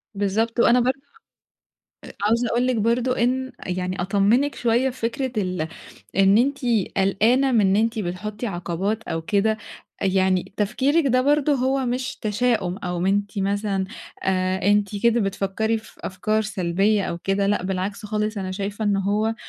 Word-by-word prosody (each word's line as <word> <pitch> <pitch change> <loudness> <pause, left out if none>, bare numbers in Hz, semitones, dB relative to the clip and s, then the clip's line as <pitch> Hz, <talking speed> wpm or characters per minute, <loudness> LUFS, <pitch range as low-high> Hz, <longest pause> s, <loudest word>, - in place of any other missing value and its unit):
بالضبط 215 +4 0
وأنا 240 +1 +5
برضو 255 +2 +1 1.1
أ - - -10
عاوزة 230 +3 +2
أقول 240 +2 +1
لِك 255 -1 +1
برضو 235 +3 +1
إن 260 +2 0
يعني 185 0 -2
أطمنِك 205 +9 +2
شوية 240 +3 +1
فكرة 250 +1 -3
ال 180 -4 -2 0.5
إن 195 +2 +5
أنتِ 275 +3 +1 0.4
قلقانة 225 +8 +3
من 230 - +4
إن 195 -1 +3
أنتِ 225 +2 +1
بتحطي 210 +4 -4
عقبات 190 +3 -2
أو 165 -6 -4
كده، 215 +5 +1 0.4
يعني 190 -1 +1
تفكيرِك 270 +9 +1
ده 255 0 +3
برضو 290 +1 +3
هو 265 0 0
مش 250 +1 -2
تشاؤم، 210 -4 0
أو 180 -2 -2
أنتِ 205 +1 0
مثلًا 200 0 0 0.4
آآ 185 0 0
أنتِ 205 0 +1
كده 235 0 +4
بتفكري 200 +3 -1
في 220 - -17
أفكار 215 +3 -1
سلبية 200 0 +1
أو 170 - -4
كده، 195 +2 0
لأ 205 -2 +1
بالعكس 190 +3 -3
خالص 215 0 -2
أنا 190 -1 -4
شايفة 205 +2 -4
إن 205 -1 +2
هو 205 +3 0
210 Hz, 155 wpm, -23 LUFS, 195-240 Hz, 1.1 s, وأنا